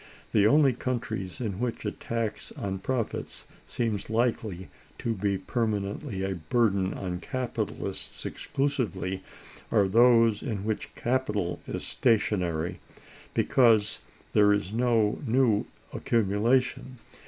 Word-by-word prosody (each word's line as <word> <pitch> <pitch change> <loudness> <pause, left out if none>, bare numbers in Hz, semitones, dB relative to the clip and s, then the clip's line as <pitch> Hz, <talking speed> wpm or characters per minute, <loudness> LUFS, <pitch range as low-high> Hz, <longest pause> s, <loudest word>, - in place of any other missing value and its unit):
The 105 -1 +5
only 140 +2 +5
countries 110 -7 -3
in 105 -6 -3
which 120 -1 -3
a - - 0
tax 115 -2 -4
on 95 -1 -4
profits 120 +2 -3 0.2
seems 110 -5 -2
likely 110 -5 0 0.3
to 115 - -1
be 100 -1 0
permanently 105 +1 -2
a 95 0 -1
burden 95 +2 +1
on 90 -2 -4
capitalists 130 +3 -4
exclusively 105 -9 -2 0.5
are 100 -3 +4
those 115 0 +5
in 105 -6 -3
which 110 -1 -3
capital 105 -8 -1
is - - -4
stationary, 90 -8 +1 0.6
because 110 -5 +3 0.3
there 105 -1 +6
is 100 -1 0
no 115 -3 +2
new 120 -4 +2 0.3
accumulation. 120 +4 +1
110 Hz, 110 wpm, -28 LUFS, 100-120 Hz, 0.6 s, there